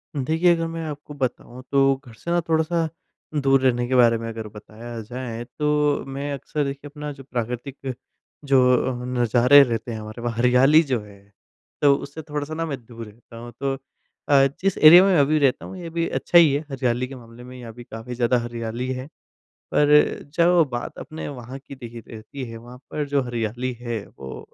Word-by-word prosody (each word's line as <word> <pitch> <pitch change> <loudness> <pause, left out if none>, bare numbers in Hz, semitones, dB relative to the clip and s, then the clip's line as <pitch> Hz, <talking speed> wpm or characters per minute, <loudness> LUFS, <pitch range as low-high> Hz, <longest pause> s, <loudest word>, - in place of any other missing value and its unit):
देखिए 160 +6 +2
अगर 165 0 -2
मैं 165 0 -5
आपको 150 -1 -7
बताऊँ, 130 -2 -4
तो 135 -1 +4
घर 120 - -13
से 170 +10 -6
ना 175 - +3
थोड़ा-सा 160 +1 +1 0.5
दूर 135 -1 +4
रहने 120 -2 +2
के 130 - 0
बारे 120 -2 +5
में 115 0 -6
अगर 110 -1 -6
बताया 110 +3 -10
जाए, 120 +1 -6
तो 150 +2 0
मैं 140 +2 -4
अक्सर 145 +2 -3
देखिए 140 +1 -5
अपना 150 0 -6
जो 135 -1 -11
प्राकृतिक 125 +2 -5 0.5
जो 135 -2 +4 0.3
अ, 125 0 -6
नज़ारे 125 +2 +5
रहते 120 -2 -3
हैं 110 - -5
हमारे, 110 +2 -8
वह 120 0 -1
हरियाली 125 +6 +5
जो 130 -5 -1
है, 100 -1 -15 0.6
तो 140 -1 +6
उससे 145 +3 -7
थोड़ा-सा 150 0 -5
ना 165 +1 -2
मैं 145 -4 -4
दूर 115 -1 -9
रहता 115 +2 -15
हूँ। 120 +1 -9
तो 135 -1 0 0.6
अ, 140 -1 +6 0.2
जिस 195 0 +1
एरिया 170 +4 +9
में 195 -2 +3
अभी 150 +2 +3
रहता 135 -3 +1
हूँ 190 - -8
ये 175 -2 -7
भी 165 0 -1
अच्छा 175 - +2
ही 160 -5 +7
है। 145 - 0
हरियाली 125 -1 -1
के 135 - -9
मामले 120 -1 -13
में, 125 +1 -11
यहाँ 120 -2 -9
भी 120 +1 -11
काफ़ी 115 +2 -8
ज़्यादा 120 +1 +2
हरियाली 120 +1 -4
है। 130 +1 -6 0.7
पर 145 - +3 0.5
जब 175 0 +5
बात 120 0 -5
अपने 155 - -7
वहाँ 130 -1 -8
की 140 0 -11
देखिए 120 -3 -9
रहती 115 +4 -8
है, 115 - -8
वहाँ 120 +2 -12
पर 150 - -2
जो 140 -1 +1
हरियाली 120 +1 -3
है, 120 -4 -4
वो 65 -1 -9
130 Hz, 200 wpm, -23 LUFS, 120-145 Hz, 0.7 s, एरिया